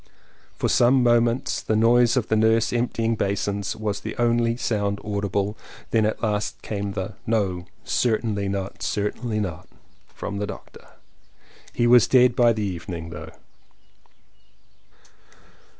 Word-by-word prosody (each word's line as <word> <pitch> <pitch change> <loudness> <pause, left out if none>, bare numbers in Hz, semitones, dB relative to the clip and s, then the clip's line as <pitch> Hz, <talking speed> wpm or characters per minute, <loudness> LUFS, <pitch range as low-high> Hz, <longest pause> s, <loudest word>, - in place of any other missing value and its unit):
For - - 0
some 125 +1 +4
moments 120 0 +2
the 110 - -1
noise 120 +2 +4
of 120 - 0
the 110 - +1
nurse 110 +1 +3
emptying 115 -1 0
basins 100 -1 -2
was 105 -2 -3
the - - -7
only 120 0 +2
sound 100 -4 -1
audible. 100 0 -1 0.4
Then 110 -2 +3
at 110 - -4
last 105 -1 -1
came 100 -2 -3
the 95 +1 -4
"No, 95 -6 0 0.2
certainly 110 -4 0
not, 95 0 -4
certainly 110 +2 -2
not!" 90 -6 -4 0.4
from 100 0 -6
the 105 - -2
doctor. - - -11 0.8
He 120 - 0
was 120 -1 +6
dead 125 -2 +5
by 120 -1 +5
the 110 -2 -2
evening 85 -3 -5
though. - - -8
110 Hz, 135 wpm, -24 LUFS, 100-120 Hz, 0.8 s, was